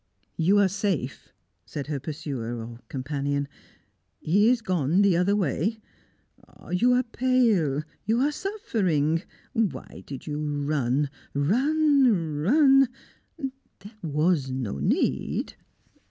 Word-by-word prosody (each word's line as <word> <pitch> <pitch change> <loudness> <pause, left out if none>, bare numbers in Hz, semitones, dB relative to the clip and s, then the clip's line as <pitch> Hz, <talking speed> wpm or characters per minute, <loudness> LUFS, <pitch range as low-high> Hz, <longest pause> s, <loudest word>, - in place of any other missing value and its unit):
"You 185 +5 +3
are 200 -1 +5
safe," 190 - -3 0.3
said 145 -2 -6
her 145 -2 -3
pursuer, 135 -5 -5
or 115 +1 -8
companion. 140 +1 -2 0.7
"He 205 +8 +3
is 245 -2 +2
gone 180 0 +2
the 195 -3 +4
other 180 +4 +2
way. 200 - 0 0.7
Ah! - - -17
you 235 +8 +3
are 250 +1 +3
pale! 230 - +2 0.2
You 225 +3 +2
are 290 +2 +2
suffering! 195 - 0 0.3
Why 205 - -2
did 135 -2 -7
you 150 0 -3
run 145 -2 0 0.2
run 250 - +3
run? 270 - +5 0.5
There 260 -7 -9
was 155 -2 +1
no 125 - -3
need." 70 - 0
175 Hz, 115 wpm, -26 LUFS, 145-230 Hz, 0.7 s, are